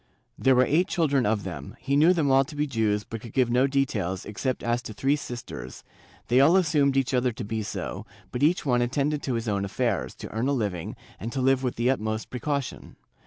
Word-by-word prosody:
There 135 -1 +3
were 125 +1 +5
eight 175 +6 +2
children 140 - +1
of 105 -2 0
them; 75 -7 -7
he 140 - -1
knew 155 +5 +6
them 160 -6 +2
all 135 +1 +5
to 150 - -10
be 145 +1 0
Jews 110 -6 0
but 115 0 -7
could 115 - -10
give 125 -3 +2
no 125 +3 +4
details, 105 -10 -1
except 125 +5 -3
as 120 +1 0
to 110 - -8
three 135 +6 +1
sisters: 120 - -7 0.4
they 125 +2 +4
all 160 +7 +6
assumed 145 -6 +2
each 135 0 +1
other 125 0 +2
to 115 +1 -7
be 110 +1 -3
so, 105 - -5 0.2
but 125 - -4
each 165 +5 +3
one 125 -3 +2
attended 140 +4 0
to 130 - -2
his 115 0 -3
own 100 -2 0
affairs, 105 0 -1
to - - -9
earn 115 +4 -1
a 140 - +2
living, 100 -10 -2 0.2
and 115 +5 -5
to 135 - -2
live 130 0 +3
with 125 -2 -2
the 120 +2 +2
utmost 110 -3 -3
precaution. 140 +2 -3
125 Hz, 225 wpm, -26 LUFS, 110-140 Hz, 0.4 s, knew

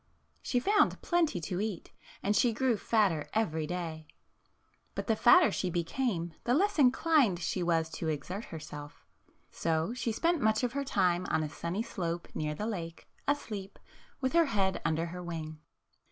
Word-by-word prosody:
She 245 - 0
found 410 +10 +3
plenty 335 - +1
to 180 +3 -2
eat, 210 -5 -4 0.3
and 205 +1 +1
she 235 +2 +3
grew 255 +1 +2
fat 215 0 +3
ter 155 -3 -4
every 160 -8 0
day. 160 -3 -4 0.9
But - - -3
the 225 - +2
fatter 350 +11 +6
she 185 - -1
became, 175 0 -1
the 245 - +2
less 400 +2 +2
inclined 265 - +4
she 175 +2 -2
was 165 -2 +2
to 160 - -4
exert 165 +8 -3
herself. 150 -2 -9 0.5
So 160 +5 0
she 235 -2 -2
spent 335 +7 +1
much 220 +2 +2
of 245 -1 0
her 280 0 -1
time 185 -8 +1
on 160 - +1
a 150 - -3
sunny 170 +7 -3
slope 170 -6 -4
near 150 0 -2
the 210 - -3
lake, 170 -7 -5 0.2
asleep, 210 -9 -2 0.4
with 260 -1 -1
her 335 0 +5
head 195 - 0
under 165 0 0
her 180 +1 -6
wing. 160 -3 -6
190 Hz, 170 wpm, -31 LUFS, 165-245 Hz, 0.9 s, fatter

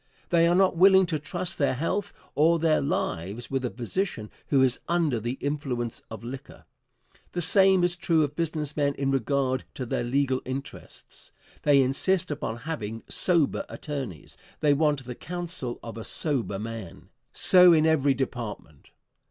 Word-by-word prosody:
They 170 -1 +4
are 175 - +3
not 190 -1 +3
willing 190 +2 +6
to 160 -3 -2
trust 175 +4 -3
their 140 -3 +2
health 190 +8 -2 0.2
or 160 +4 +4
their 160 -1 +2
lives 105 - -3
with 135 -1 -1
a 125 - -1
physician 120 - -4 0.2
who 135 -2 +3
is 130 -1 +2
under 165 -8 +1
the 120 +3 -3
influence 135 -4 -3
of 110 +1 -9
liquor. 130 +3 -9 0.7
The 175 - -1
same 190 0 +5
is 175 0 +2
true 165 -3 +2
of 145 0 -3
business 155 -3 -2
men 140 -2 0
in 135 0 -1
regard 135 0 0
to 130 - -4
their 120 - -2
legal 130 +1 0
interests. 135 +2 -9 0.3
They 140 -2 +4
insist 170 +7 +1
upon 115 -5 -4
having 115 -9 -5
sober 170 -6 +1
attorneys; 135 - -7 0.2
they 150 -2 +3
want 145 -2 +1
the 125 0 -6
counsel 170 -4 -4
of 115 -1 -7
a - - -6
sober 130 -10 -1
man. 110 -4 -8 0.2
So 180 -1 +7
in 160 -2 +4
every 145 -4 +3
department. 115 - -6
140 Hz, 160 wpm, -26 LUFS, 125-165 Hz, 0.7 s, So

